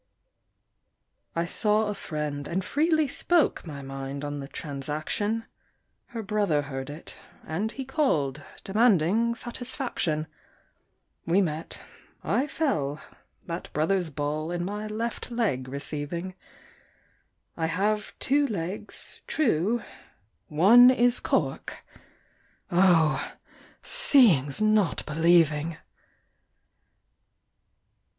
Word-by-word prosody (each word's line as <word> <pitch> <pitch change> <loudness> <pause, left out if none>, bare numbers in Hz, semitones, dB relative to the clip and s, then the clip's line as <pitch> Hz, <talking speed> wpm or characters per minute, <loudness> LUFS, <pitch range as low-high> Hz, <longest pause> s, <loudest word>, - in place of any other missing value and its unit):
I 170 0 0
saw 210 +5 +1
a 210 - -2
friend, 150 -6 -4
and 185 +2 -2
freely 315 - +2
spoke 330 - +1
My 140 -3 -7
mind 135 +1 -5
on 145 0 -4
the 135 - -6
transaction; 155 +11 -3 0.6
Her 230 -2 -6
brother 195 -8 +1
heard 135 -1 -6
it, 150 +3 -9 0.3
and 200 +8 -2
he 270 +1 -6
called, 160 - 0 0.2
Demanding 215 +1 +3
satisfaction. 235 - -2 1.0
We 175 +4 +4
met 165 -4 -2 0.4
I 275 - +1
fell 155 - -1 0.5
that 170 0 -6
brother's 170 +3 +1
ball 150 +2 -3
In 175 0 -2
my 210 +2 -4
left 225 +3 -4
leg 205 - -1
receiving; 150 +6 -4 1.2
I 160 -1 -1
have 210 +5 -1
two 285 +1 +2
legs, 190 -3 -6
true 225 - +1 0.6
one 215 +11 +7
is 245 -1 +3
cork: - - -2 0.9
Oh! 170 -5 +3 0.5
seeing's 215 - +4
not 215 -3 +2
believing! 160 0 +3
175 Hz, 95 wpm, -27 LUFS, 150-225 Hz, 1.2 s, one